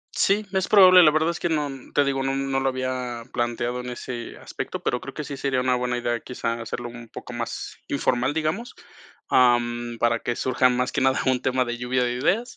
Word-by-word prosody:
Sí, 205 +2 +2
es 190 -1 0
probable, 185 -3 +8
la 155 - +7
verdad 155 +2 +1
es 170 - -5
que 175 - 0
no, 150 -3 0
mm, 135 -2 -11
te 145 - +4
digo, 135 -1 0
no, 135 0 0
mm, 135 0 -2
no 135 0 +1
lo 135 - +1
había 130 -2 -3
planteado 120 +1 -2
en 125 - -7
ese 120 -1 -6
aspecto, - - -6
pero 125 - -1
creo 135 - -9
que 150 - -5
sí 140 0 -6
sería 135 -2 0
una 125 0 +2
buena 125 0 -1
idea, 120 -1 -1
quizás 115 -1 -4
hacerlo 120 +1 -5
un 120 -1 -11
poco 125 - -9
más 120 -1 -5
informal, 130 +4 0
digamos, 160 +10 -2 0.6
am, 120 -1 +2
para 115 0 +2
que 120 - -3
surjan 125 -1 +2
más 125 +1 -1
que - - -1
nada 130 0 +3
un 130 -1 +2
tema 130 0 +1
de 120 0 -4
lluvia 125 +1 0
de 120 - 0
ideas. 185 - 0
130 Hz, 230 wpm, -24 LUFS, 120-140 Hz, 0.6 s, probable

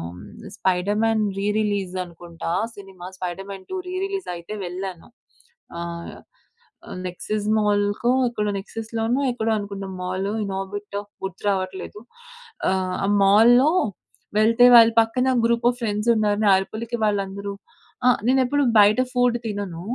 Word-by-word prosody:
హ్మ్. - - -11 0.3
'Spiderman' 210 +4 +1
re 200 - -1
release 200 -3 -1
అనుకుంటా 170 -1 -7 0.2
cinema 190 -3 -11
'Spiderman 190 +2 -6
2' 375 - -2
re 365 - -5
release 390 -1 -4
అయితే 170 +5 -8
వెళ్ళాను. 180 -1 -6 0.7
ఆహ్, 170 0 -6 0.7
ఆహ్, - - -7
నెక్సస్ 205 +4 -4
మాల్‌కో 205 +3 +1 0.2
ఎక్కడో 210 -3 -2
నెక్సస్‌లోనో 225 +5 -3
ఎక్కడో 225 -2 -1
అనుకుంట 200 -1 -5 0.2
మాలు 185 +3 -2
ఇన్ 195 -1 -4
ఆర్బిటో 205 +1 -5 0.2
గుర్తు 190 0 -6
రావట్లేదు. 190 +2 -3 0.7
ఆహ్, 185 -1 -1
ఆ - - 0 0.2
మాల్‌లో 240 +8 +6 0.7
వెళ్తే 230 +3 +5
వాళ్ళ 230 -1 +8
పక్కన 250 +3 0 0.2
గ్రూప్ 235 +1 +2
ఆఫ్ 245 - -12
ఫ్రెండ్స్‌న్నారు. 210 -1 +1
నా 200 - +6
అరుపులకి 230 +4 -5
వాళ్ళందరూ 200 -1 -2 0.5
ఆ! - - +8 0.2
నేనేప్పుడు 265 +2 +2
బయట 210 +3 +6
ఫుడ్ 245 -2 +2
తినను. 200 -6 -4
205 Hz, 125 wpm, -23 LUFS, 190-225 Hz, 0.7 s, వాళ్ళ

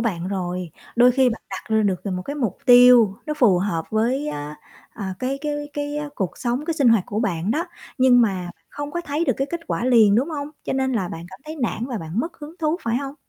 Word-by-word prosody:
bạn 185 -6 -2
rồi, 180 -3 -3 0.3
đôi 245 +1 +7
khi 260 0 +4
bạn 225 - -5
đặt 190 - -6
ra 215 - +3
được 195 -1 -1
một 180 0 -3
cái 285 +8 -5
mục 235 -9 -2
tiêu 245 -4 +7
nó 305 - -2
phù 235 -11 +4
hợp 175 -4 -1
với 245 +7 0
á, 150 - -5 0.3
à, 190 -4 -5
cái 265 +2 -2
cái 300 0 -2 0.2
cái 290 0 -3 0.2
cuộc 190 -8 -3
sống 245 +4 -1
cái 330 0 -1
sinh 275 -6 +3
hoạt 230 -4 +5
của 210 - -2
bạn 190 -4 -1
đó 310 +8 0 0.3
nhưng 255 -1 +6
mà 190 -6 0 0.2
không 290 0 -6
có 345 - -3
thấy 305 0 -2
được - - +2
cái 270 - -1
kết 340 - -3
quả - - -2
liền, 225 -5 +5
đúng 255 +8 +2
hông? 290 -2 -4 0.2
Cho - - -2
nên 265 0 0
là 195 -7 -1
bạn 165 0 -7
cảm 190 +1 -13
thấy 310 +1 -7
nản 235 0 -1
và 250 -4 -4
bạn 165 +5 -3
mất 330 +5 -5
hứng 300 +2 -9
thú 310 0 0
phải 230 +1 0
hông? 275 +1 -4
240 Hz, 250 wpm, -22 LUFS, 195-285 Hz, 0.3 s, đôi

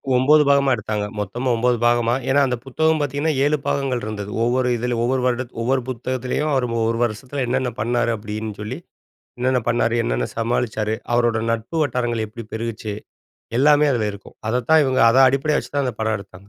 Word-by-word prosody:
9 150 +4 +5
பாகமா 140 -1 +4
எடுத்தாங்க. 105 -2 -3
மொத்தமா 120 +6 -2
9 125 +1 +2
பாகமா. 120 0 +3 0.2
ஏன்னா 135 +2 +4
அந்த 125 - 0
புத்தகம் 160 +4 +1
பார்த்தீங்கன்னா, 145 +2 0
7 150 +1 +2
பாகங்கள் 135 -3 0
இருந்தது. 105 -1 -5
ஒவ்வொரு 125 +1 +1
இதில 120 +1 -2
ஒவ்வொரு 130 +2 +1
வருடத் 125 0 -1
ஒவ்வொரு 130 +2 +1
புத்தகத்திலேயும், 130 +4 -2
அவர் 130 -2 +1 0.2
ஒரு 115 - -1
வருஷத்துல 125 +5 -3
என்னன்ன 130 0 0
பண்ணாரு? 120 +1 +1
அப்டின்னு 105 0 -6
சொல்லி, 105 - -5 0.6
என்னென்ன 125 +1 +1
பண்ணாரு? 115 0 +1
என்னென்ன - - -1
சமாளிச்சாரு? 115 -2 -1 0.2
அவரோட 120 -2 +2
நட்பு 115 +7 -3
வட்டாரங்கள் 120 -5 -1
எப்டி 115 +2 -9
பெருகுச்சு? 110 -2 -4 0.6
எல்லாமே 150 +2 +5
அதுல 110 -4 0
இருக்கும். 100 - -13
அதத்தான் 125 +6 +3
இவங்க 130 -1 +1
அத 115 - +2
அடிப்படையா 140 +3 +1
வச்சுதான் 140 -1 -2
அந்த 125 - -3
படம் 110 0 0
எடுத்தாங்க. 100 0 -14
120 Hz, 165 wpm, -21 LUFS, 110-130 Hz, 0.6 s, 9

